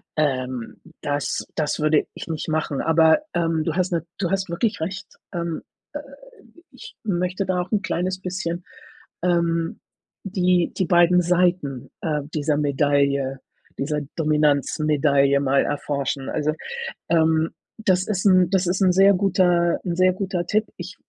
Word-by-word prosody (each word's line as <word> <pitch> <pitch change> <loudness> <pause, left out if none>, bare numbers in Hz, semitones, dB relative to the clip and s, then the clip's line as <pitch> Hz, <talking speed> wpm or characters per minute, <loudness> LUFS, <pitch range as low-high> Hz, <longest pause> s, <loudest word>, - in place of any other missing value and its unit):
Ähm, 130 -5 -2 0.2
das 145 -1 -2
das 150 -2 -1
würde 155 0 +2
ich - - -8
nicht 160 -1 -4
machen. 155 -3 -1
Aber, 160 - +4
ähm, 165 -2 0
du 165 0 -2
hast 185 0 0
na 170 -1 0 0.2
du 185 -3 -2
hast 190 -2 -1
wirklich 205 +5 -1
recht, 190 +4 -4 0.3
ähm, 170 -2 -3 0.3
äh, - - -4 0.7
ich 255 - -12
möchte 185 -1 -1
da 180 -1 0
auch 180 - -7
'n 210 - +1
kleines 185 0 -2
bisschen, 180 -2 -4 0.6
ähm, 170 -2 0 0.4
die 180 -3 +1
die 185 - +1
beiden 175 +1 +5
Seiten, 175 -7 0
äh, 150 -2 -1
dieser 150 -1 0
Medaille 140 -2 +1 0.4
dieser 150 +2 -1 0.2
Dominanzmedaille 150 -2 +2
mal 135 0 +2
erforschen. 140 -2 -2
Also, 155 0 0 0.6
ähm, 160 -1 +3 0.3
das 190 -4 +1
ist 195 -3 -2
'n 185 -2 +5
das 190 -2 +1
ist 185 +3 0
'n 185 -1 +5
sehr 195 +2 +6
guter 180 -3 +2
'n 170 -1 -1
sehr 185 0 +4
guter 185 -2 -3
Tipp. 215 +4 +1
Ich 180 +1 -8
170 Hz, 150 wpm, -23 LUFS, 150-185 Hz, 0.7 s, sehr